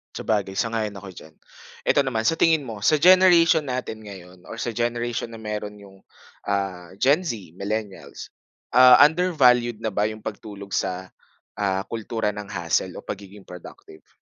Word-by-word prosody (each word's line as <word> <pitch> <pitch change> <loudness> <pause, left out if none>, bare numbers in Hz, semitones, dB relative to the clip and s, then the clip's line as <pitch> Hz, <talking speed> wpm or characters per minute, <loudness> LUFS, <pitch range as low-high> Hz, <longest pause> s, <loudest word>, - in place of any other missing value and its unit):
Sabagay, 100 -3 -2
sang-ayon 110 -1 -2
ako 100 -1 -9
diyan. 80 -3 -14 0.5
Eto - - +2
naman 130 -5 0
sa 165 +8 +1
tingin 160 -3 +3
mo, 115 -5 -8
sa 130 +9 +3
generation 170 -2 +5
natin 125 -3 -4
ngayon 95 -4 -13
or - - -8
sa 120 - -3
generation 120 +1 -2
meron 105 -1 -6
yung, 100 -1 -16 0.5
ah, 95 -3 -3
Gen 135 - +3
Z, 105 - -6
millennials. 105 0 -6 0.4
Ah, 125 +1 +8
undervalued 130 -9 +3
na 110 - -1
ba 105 +1 0
yung 110 0 -8
pagtulog 100 -2 -8
sa, 95 -1 -3 0.5
ah, 95 -1 0
kultura 110 -1 -3
ng 105 0 -8
hustle 90 -1 -2
o - - -9
pagiging 100 0 -9
productive? 90 -3 -13
105 Hz, 150 wpm, -23 LUFS, 100-125 Hz, 0.5 s, Ah